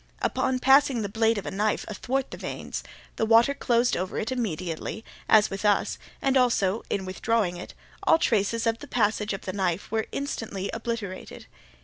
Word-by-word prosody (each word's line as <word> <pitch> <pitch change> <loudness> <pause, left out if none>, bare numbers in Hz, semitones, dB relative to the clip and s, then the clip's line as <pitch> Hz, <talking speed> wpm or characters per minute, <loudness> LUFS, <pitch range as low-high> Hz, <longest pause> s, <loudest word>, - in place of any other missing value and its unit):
Upon 260 - +1
passing 265 -2 +4
the 200 - -3
blade 225 +2 +2
of 200 - -4
a - - -4
knife 210 +2 0
athwart 260 +5 -2
the - - -5
veins, - - -5 0.4
the 220 - +1
water 230 +5 +5
closed 240 -3 +2
over 185 +1 -3
it 220 - -2
immediately, 185 -3 -3 0.2
as 215 -1 +5
with 195 +1 -5
us, 205 -1 +2 0.2
and 270 -1 +2
also, 235 -5 +2
in 190 -2 -1
withdrawing 190 0 0
it, 175 - -9 0.3
all - - +5
traces 230 -3 +1
of 230 0 +1
the 290 - -10
passage 215 -3 +1
of 195 - -4
the 185 - -5
knife 185 -1 -1
were 220 0 0
instantly 220 -8 -4
obliterated. 225 -5 -5
220 Hz, 175 wpm, -26 LUFS, 195-240 Hz, 0.4 s, water